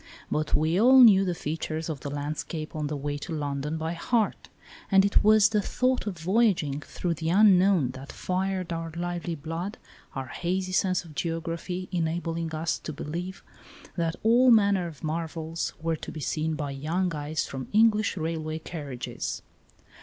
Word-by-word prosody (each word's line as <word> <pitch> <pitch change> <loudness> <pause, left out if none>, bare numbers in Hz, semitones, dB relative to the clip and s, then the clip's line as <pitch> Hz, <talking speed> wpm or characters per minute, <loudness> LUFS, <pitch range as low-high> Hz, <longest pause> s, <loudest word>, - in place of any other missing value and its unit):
But 155 0 +1
we 160 +5 +2
all 260 +3 +7
knew 195 -5 +7
the 180 -2 -1
features 160 0 -3
of 155 -4 -4
the 140 - -5
landscape 155 +2 -4
on 150 -1 -2
the 150 0 -3
way 145 +1 -3
to 175 - -7
London 145 +1 -2
by 160 +1 -2
heart, 215 +6 -1 0.4
and 195 -1 +5
it 200 - +3
was 215 0 +6
the 210 -1 +1
thought 255 +3 0
of 190 -4 -3
voyaging 175 -5 +2
through 175 +3 -3
the 160 0 -3
unknown 190 - +5
that 130 +2 -9
fired 185 -1 -2
our 165 0 -4
lively 175 -1 -3
blood, 165 +7 -5 0.4
our 135 - -3
hazy 185 +7 -2
sense 185 -2 +1
of 160 - -12
geography 165 +3 -3
enabling 165 -1 -2
us 160 +1 -1
to - - -6
believe 175 +6 -5 0.5
that 165 -1 -1
all 240 +3 +5
manner 200 -5 +4
of 160 -2 -11
marvels 160 +1 -3
were 165 +1 -1
to - - -8
be 155 - -7
seen 155 +2 -1
by 145 -2 -3
young 165 +6 -1
eyes 150 +1 -2
from 130 -1 -6
English 215 -2 +3
railway 160 -1 -2
carriages. 145 -6 -5
165 Hz, 170 wpm, -27 LUFS, 155-190 Hz, 0.5 s, all